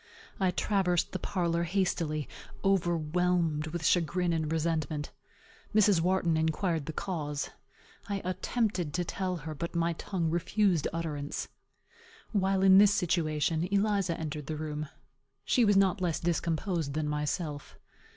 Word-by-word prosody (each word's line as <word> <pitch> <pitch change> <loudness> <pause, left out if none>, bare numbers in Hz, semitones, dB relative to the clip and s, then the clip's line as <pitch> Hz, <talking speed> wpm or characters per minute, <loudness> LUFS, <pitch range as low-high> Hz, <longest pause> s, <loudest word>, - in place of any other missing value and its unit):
I 190 -2 +3
traversed 180 -2 +1
the 185 - -3
parlor 170 -3 0
hastily, 170 -4 0 0.4
overwhelmed 175 -3 +1
with 160 0 -4
chagrin 175 0 +2
and 160 -2 -1
resentment. 155 -2 -1 0.6
Mrs. 205 -5 +5
Wharton 175 -2 +2
inquired 160 0 0
the - - -2
cause. 150 -4 -3 0.6
I 200 -1 -1
attempted 185 -3 -1
to 175 0 0
tell 185 +1 -2
her, 160 -1 -6
but 170 +3 -5
my 170 0 +1
tongue 165 -1 -2
refused 175 -1 +1
utterance. 150 -3 -4 0.8
While 195 -2 +1
in 190 0 +8
this 205 0 +7
situation, 165 -3 0
Eliza 200 -4 +1
entered 150 -2 -5
the 155 - -3
room. 150 -1 -4 0.6
She 245 - +3
was 205 -2 +4
not 195 -1 +3
less 170 -3 0
discomposed 165 -2 -1
than 155 -1 -1
myself. 150 0 -3
170 Hz, 130 wpm, -30 LUFS, 155-185 Hz, 0.8 s, in